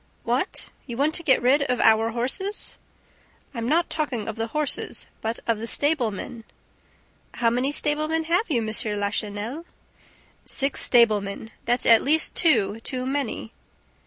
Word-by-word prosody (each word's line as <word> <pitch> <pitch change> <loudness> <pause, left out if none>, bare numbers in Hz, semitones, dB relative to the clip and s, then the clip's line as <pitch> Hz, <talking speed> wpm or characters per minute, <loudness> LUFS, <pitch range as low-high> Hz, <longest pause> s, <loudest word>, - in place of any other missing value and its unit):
"What, - - -2 0.2
you 235 -2 -6
want 295 +4 +1
to 340 - -2
get 265 -6 +3
rid 270 +4 +4
of 250 -3 0
our 225 0 +4
horses?" 265 - -3 0.8
"I'm 230 -1 -3
not 340 +3 +2
talking 270 -8 -3
of 225 - -4
the 225 0 -3
horses, 300 +5 -1 0.2
but 225 +1 -3
of 230 -2 0
the 230 - -5
stablemen." 235 -5 0 0.9
"How 230 -1 +2
many 250 +4 0
stablemen 305 +2 0
have 350 +7 0
you, 245 -7 +1
M. 215 -1 -1
Lachenel?" 205 +8 -3 0.8
"Six 275 0 0
stablemen! 220 -3 +2
That's 245 +1 +1
at 230 -1 +7
least 310 +3 +2
two 220 - +3
too 255 +2 -3
many." 265 -4 -3
245 Hz, 145 wpm, -24 LUFS, 225-295 Hz, 0.9 s, at